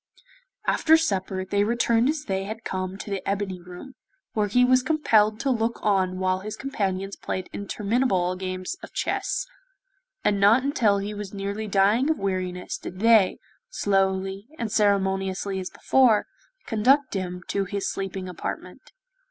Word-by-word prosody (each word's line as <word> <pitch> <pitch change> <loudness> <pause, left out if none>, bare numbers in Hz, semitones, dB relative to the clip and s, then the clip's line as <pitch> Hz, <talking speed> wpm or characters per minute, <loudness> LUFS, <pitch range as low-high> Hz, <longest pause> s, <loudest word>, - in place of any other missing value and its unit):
After 320 0 +4
supper, 190 -10 -1
they 200 +2 +1
returned 235 +2 +2
as 305 -1 -1
they 195 -5 -2
had 220 +2 -6
come 185 0 -3
to 205 - -7
the 195 - -2
ebony 195 -2 -2
room, 180 +9 -11 0.4
where 210 -1 +1
he 250 +5 +4
was 255 0 +4
compelled 225 -7 +2
to 275 -1 +1
look 230 -1 0
on 190 -3 +1
while 185 0 0
his 210 +2 -6
companions 195 -7 -2
played 185 - -4
interminable 200 -3 0
games 185 - -4
of - - -11
chess, - - -1 0.8
and 200 -1 +2
not 215 +6 +5
until 230 -8 +2
he 200 +1 -3
was 205 -1 -7
nearly 200 +2 -3
dying 205 +8 +3
of 315 - +2
weariness 185 -2 -3
did 185 - -8
they, 220 -3 +5 0.3
slowly 195 - 0
and 230 -3 -3
ceremoniously 195 -2 +1
as 185 - -5
before, 245 -6 +3 0.4
conduct 255 +5 +3
him 180 -2 -4
to 200 -1 0
his 200 +1 -3
sleeping 190 -1 -4
apartment. 180 - -7
200 Hz, 150 wpm, -25 LUFS, 190-230 Hz, 0.8 s, not